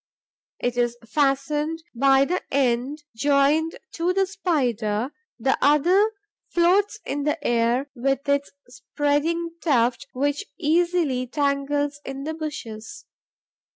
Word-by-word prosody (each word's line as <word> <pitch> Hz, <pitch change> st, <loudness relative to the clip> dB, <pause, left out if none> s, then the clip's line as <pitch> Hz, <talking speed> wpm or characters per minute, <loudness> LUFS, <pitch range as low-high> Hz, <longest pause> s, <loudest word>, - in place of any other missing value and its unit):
It 245 Hz, 0 st, -2 dB
is 240 Hz, -1 st, +1 dB
fastened 295 Hz, +5 st, 0 dB
by 270 Hz, +2 st, +4 dB
the 360 Hz, +5 st, -1 dB
end 265 Hz, +2 st, 0 dB
joined 285 Hz, +5 st, +2 dB, 0.2 s
to 345 Hz, +2 st, 0 dB
the 390 Hz, +1 st, +2 dB
Spider; 255 Hz, -, -1 dB, 0.3 s
the 255 Hz, +3 st, +1 dB
other 350 Hz, +10 st, +4 dB, 0.4 s
floats 380 Hz, +5 st, +3 dB
in 285 Hz, -, -2 dB
the 300 Hz, +2 st, 0 dB
air, 240 Hz, +3 st, +2 dB
with 270 Hz, +3 st, -1 dB
its 280 Hz, 0 st, +1 dB, 0.2 s
spreading 295 Hz, +6 st, -1 dB
tuft, 255 Hz, -3 st, +1 dB
which 285 Hz, +6 st, 0 dB
easily 330 Hz, -5 st, +1 dB
tangles 285 Hz, +1 st, -1 dB
in 270 Hz, 0 st, -6 dB
the 315 Hz, +2 st, -3 dB
bushes. 295 Hz, -, -7 dB
285 Hz, 115 wpm, -24 LUFS, 260-320 Hz, 0.4 s, by